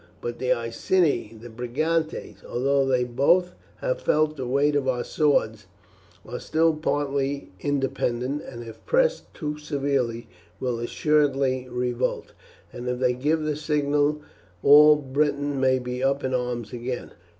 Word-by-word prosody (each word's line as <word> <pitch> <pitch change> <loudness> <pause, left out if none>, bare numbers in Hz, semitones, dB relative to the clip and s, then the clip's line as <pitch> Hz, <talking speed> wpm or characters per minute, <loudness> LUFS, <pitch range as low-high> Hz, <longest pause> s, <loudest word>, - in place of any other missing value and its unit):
But 120 0 -5
the 130 -1 0
Iceni 120 - 0
and 120 -2 -11
Brigantes, 155 +7 -2
although 135 +2 +1
they 130 -2 +2
both 145 +9 +2 0.3
have - - -1
felt 155 0 +2
the 130 -4 -5
weight 140 +3 +2
of 140 -2 0
our 125 -2 0
swords, 110 -9 +1 0.6
are - - -6
still 160 +1 +2
partly 140 -4 -2
independent, 135 -1 -1
and 120 -2 -9
if 115 -1 -11
pressed - - +1
too 150 -1 -4
severely 135 -6 -1 0.3
will 125 -2 -2
assuredly 135 -1 +1
revolt, 125 0 -2 0.4
and 125 +1 -5
if 125 - -1
they 125 0 +2
give 150 +5 0
the 155 -1 -1
signal 150 0 0 0.4
all 150 +1 +8
Britain 145 0 -1
may 130 0 +3
be 125 0 -4
up 135 +1 +1
in 130 - -1
arms 125 -2 -2
again. 125 +1 -5
135 Hz, 140 wpm, -25 LUFS, 125-150 Hz, 0.6 s, all